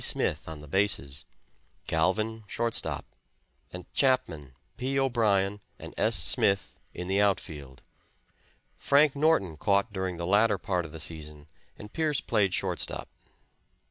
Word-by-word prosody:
Smith, - - +1
on 80 -2 -8
the 75 - -12
bases; 75 -6 +1 0.6
Galvin, 110 +7 0
shortstop; 115 +4 -2 0.7
and 90 -1 -8
Chapman, 80 - 0 0.2
P. 135 +2 -2
O'Brien 105 -6 +1 0.2
and - - -10
S. 110 +1 +1
Smith 95 +4 +1
in 90 - -6
the 95 +2 +1
outfield. 75 -9 -2 0.9
Frank 145 0 +3
Norton 140 - +2
caught 100 +4 +1
during 95 -2 -3
the 85 - -3
latter 105 +3 +3
part 90 -2 -2
of 80 - -10
the 80 - -9
season 75 -2 -6 0.3
and 105 0 -11
Pearce 155 -4 +1
played 105 -4 +1
shortstop. - - -2
100 Hz, 130 wpm, -28 LUFS, 80-115 Hz, 0.9 s, Frank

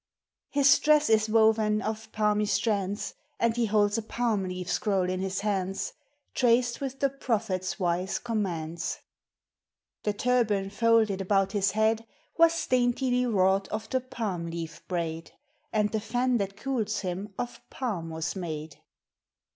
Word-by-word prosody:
His 280 0 +5
dress 300 -4 +4
is 215 0 +3
woven 220 -1 +4
of 220 0 -4
palmy 210 -1 +1
strands, 205 -2 0 0.3
And 230 -1 +2
he 240 -1 +1
holds 205 0 +2
a - - -3
palm 220 -3 -1
leaf 180 -1 -5
scroll 195 -4 +1
in 185 0 -2
his 190 0 -2
hands, 195 -2 -1 0.4
Traced 240 0 +2
with 270 -1 -4
the 275 - +3
Prophet's 215 -8 -2
wise 180 +1 0
commands! 175 -8 -3 1.0
The 210 - 0
turban 210 -4 +1
folded 220 -2 +3
about 195 0 +2
his 200 -2 +1
head 220 +1 +1 0.3
Was 335 0 +4
daintily 250 0 +2
wrought 195 -2 +2
of 215 +1 -5
the 260 - +2
palm 210 -9 -4
leaf 165 0 -6
braid, 165 -2 -3 0.4
And 210 -1 +1
the 220 - 0
fan 245 +3 +1
that 195 -2 -3
cools 225 -3 -1
him 190 +2 -5
of 245 - -5
palm 200 -11 -3
was 160 0 -3
made. 160 -4 -5
210 Hz, 145 wpm, -28 LUFS, 190-235 Hz, 1.0 s, His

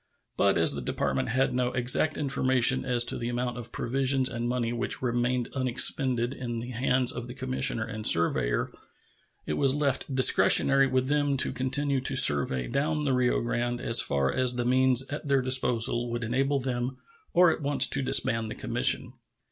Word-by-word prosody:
But - - +1
as - - +3
the - - -5
Department 65 0 -3
had 130 +2 -1
no 125 0 -1
exact 125 +5 +2
information 130 -2 +1
as 125 -2 +2
to - - +1
the 120 - -4
amount 120 0 -4
of 120 - -9
provisions 135 +1 -1
and 120 +1 -5
money 120 -1 -3
which 120 +2 -4
remained 120 0 -2
unexpended 130 -1 +1
in 120 -3 -6
the 120 +2 -7
hands 125 +1 +1
of 120 0 -8
the 120 - -10
commissioner 130 -3 -1
and 110 -1 -8
surveyor, 65 -8 +2 0.7
it - - -4
was 135 0 +2
left 140 -2 -2
discretionary 135 +1 +4
with 130 0 -1
them 145 -1 -1
to - - +2
continue 135 +1 -1
the 130 +1 -2
survey 70 - +3
down 150 - -2
the 135 -2 -1
Rio 125 -1 0
Grande 120 +1 -3
as 115 - +4
far 70 -1 -1
as 125 -1 0
the 120 -1 -3
means 130 +1 +2
at 145 +1 -7
their 135 -2 +1
disposal 120 -2 +1
would 120 0 -5
enable 135 +5 -1
them 130 -1 -4 0.3
or 180 -1 +4
at 160 - -5
once 145 0 +2
to 135 - +3
disband 115 -4 0
the - - -7
commission. - - 0
125 Hz, 180 wpm, -26 LUFS, 120-135 Hz, 0.7 s, discretionary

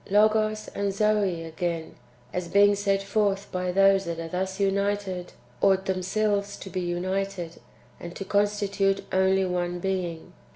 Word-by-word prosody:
Logos 215 +1 +3
and 200 0 -2
Zoe 200 -4 +1
again, 165 0 -3 0.4
as 180 -1 -2
being 205 +2 +5
sent 200 -1 0
forth 200 -1 0
by 180 -1 -1
those 195 +1 +4
that 170 -1 -4
are 165 - -4
thus 190 +3 -3
united, 200 -2 -1 0.3
ought 190 -1 +3
themselves 200 +2 0
to 190 - -9
be 185 - -2
united, 180 0 -3 0.4
and 175 0 -8
to 195 - -5
constitute 200 -1 +1
only 190 0 +3
one 175 -1 -1
being. 180 -3 -3
195 Hz, 140 wpm, -26 LUFS, 180-200 Hz, 0.4 s, being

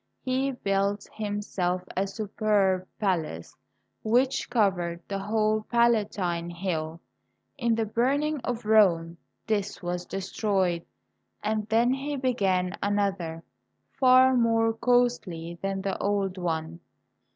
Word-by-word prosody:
He 265 +1 0
built 200 -2 -1
himself 205 -4 -2
a 195 +2 0
superb 195 -2 0
palace 165 - -2 0.5
which 255 +4 +1
covered 185 -8 +1
the 195 -1 -3
whole 215 +1 +1
Palatine 205 -8 +1
Hill. 165 -2 -3 0.6
In 235 -4 +1
the 225 0 0
burning 280 +7 0
of 240 -3 -4
Rome 175 -6 +4 0.3
this 205 -3 -2
was 175 0 -3
de - - -4
stroyed, 190 -4 0 0.6
and 215 -1 -1
then 235 +3 +3
he 280 +2 -3
began 195 -9 0
another 195 -5 -1 0.6
far 260 0 +6
more 225 -1 +3
costly 225 -9 0
than 195 0 -2
the 195 -1 -1
old 200 -2 0
one. 165 -2 -3
205 Hz, 115 wpm, -27 LUFS, 180-230 Hz, 0.6 s, far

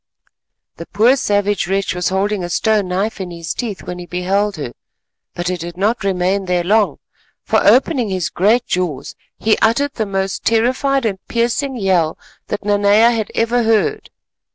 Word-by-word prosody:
The 170 - -8
poor 235 +5 +4
savage 205 -6 0
wretch 195 +1 0
was 180 -1 -1
holding 195 +1 -1
a 175 - -4
stone 215 +1 +1
knife 195 +3 -2
in 185 - -5
his 170 -1 -5
teeth 220 -6 -5
when 180 0 -6
he 175 - -8
beheld 195 +3 -1
her, 145 -6 -6 0.6
but 175 +1 -2
it 180 - -3
did 170 +1 -7
not 215 +4 0
remain 190 0 0
there 180 -1 0
long, 210 +3 +2 0.5
for - - +1
opening 250 -3 +3
his 185 -4 -2
great 220 +6 +2
jaws 175 -7 -3 0.2
he 220 0 +1
uttered 280 +6 +2
the 220 -3 -2
most 195 0 -2
terrified 255 +4 +1
and 195 -4 -1
piercing 240 +4 -1
yell 185 -6 +1 0.3
that 205 0 -4
Nanea 205 +3 +4
had 220 -3 -2
ever 235 +2 +1
heard. 225 - +1
200 Hz, 170 wpm, -18 LUFS, 180-225 Hz, 0.6 s, poor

